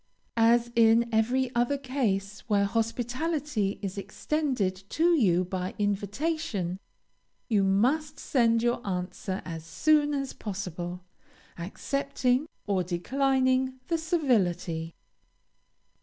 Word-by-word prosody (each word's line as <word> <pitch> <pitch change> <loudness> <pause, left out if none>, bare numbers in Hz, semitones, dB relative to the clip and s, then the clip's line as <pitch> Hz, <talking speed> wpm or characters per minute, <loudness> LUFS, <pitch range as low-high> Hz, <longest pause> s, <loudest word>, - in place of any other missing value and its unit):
As 235 +1 +4
in 230 0 +5
every 245 +3 +2
other 240 +4 +1
case 210 -8 -1
where 200 -1 +3
hospitality 240 +2 -1
is 195 0 -3
extended 225 -1 -1
to 340 +2 +3
you 185 - +3
by 185 0 -4
invitation, 205 - -1 0.7
you 210 -4 +3
must 265 +11 +2
send 230 -3 +2
your 240 0 +1
answer 185 0 -3
as 165 -2 -6
soon 295 - +2
as 275 -1 -3
possible, 180 -3 -5 0.5
accepting 260 - -1 0.2
or 195 -3 +1
declining 260 +8 +1
the 335 - +2
civility. 185 - 0
230 Hz, 100 wpm, -28 LUFS, 195-270 Hz, 0.7 s, in